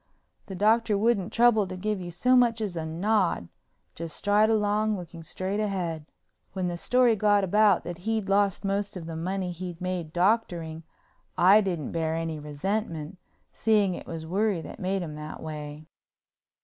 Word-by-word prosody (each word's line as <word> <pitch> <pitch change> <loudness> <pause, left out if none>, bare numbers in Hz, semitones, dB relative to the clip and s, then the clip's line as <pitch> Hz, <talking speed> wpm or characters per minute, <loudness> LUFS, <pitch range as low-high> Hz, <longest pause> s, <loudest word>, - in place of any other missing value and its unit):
The 190 - -6
Doctor 215 +1 +3
wouldn't 215 -2 +1
trouble 230 -4 +4
to 185 0 -6
give 210 +1 -2
you 175 - -6
so 245 +10 +2
much 240 -2 +4
as 205 -5 -3
a 160 -1 -3
nod, 180 - 0 0.4
just 165 -1 -6
stride 210 +2 +3
along 215 0 +1
looking 170 -2 -9
straight 185 +5 -3
ahead. 175 -7 -2 0.5
When 185 -2 -2
the 175 - -2
story 245 +5 +3
got 205 -1 +3
about 205 0 +4
that 175 -1 -6
he'd 220 +1 -2
lost 200 0 +1
most 200 0 -1
of 170 - -7
the 165 0 -6
money 185 +2 -2
he'd 175 -1 -7
made 180 -3 -3
doctoring 175 -4 0 0.6
I 195 +4 +7
didn't 175 -7 -3
bear 160 -1 -1
any 165 -1 -3
resentment, 165 +2 -3 0.3
seeing 210 -4 +2
it - - -8
was 165 -1 -6
worry 195 +2 0
that - - -10
made 190 -1 -1
him 155 -3 -6
that 150 0 -7
way. 150 -1 -7
185 Hz, 170 wpm, -27 LUFS, 165-210 Hz, 0.6 s, I